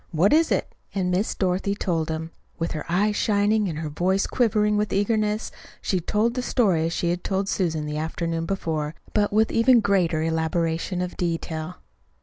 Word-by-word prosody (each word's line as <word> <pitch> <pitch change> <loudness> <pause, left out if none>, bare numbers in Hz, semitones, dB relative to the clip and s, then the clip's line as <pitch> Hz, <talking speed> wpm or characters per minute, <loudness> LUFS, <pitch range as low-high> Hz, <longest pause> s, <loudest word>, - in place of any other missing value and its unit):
What 175 - +3
is 320 +1 +4
it?" - - 0 0.2
And 185 -2 0
Miss 190 +4 0
Dorothy 190 +1 0
told 165 -5 -1
him. 160 +1 -4 0.3
With 165 - -2
her 155 - -5
eyes 205 +5 +2
shining, 205 -1 +2
and 155 - -4
her 155 -1 -3
voice 185 +6 +1
quivering 210 -3 +2
with 210 0 0
eagerness, 210 +1 0 0.3
she 185 - 0
told 210 +7 0
the 250 - -2
story 190 -11 +2
as - - -3
she 170 0 0
had 175 +1 -3
told 195 0 0
it - - -5
to - - +1
Susan 160 -5 -1
the 150 0 -3
afternoon 165 +1 -2
before, 160 -5 -2 0.2
but 205 -1 +2
with 215 +1 +3
even 240 +2 +5
greater 180 -7 +1
elaboration 165 +2 -1
of 180 - -6
detail. 165 0 -3
180 Hz, 190 wpm, -24 LUFS, 165-210 Hz, 0.3 s, even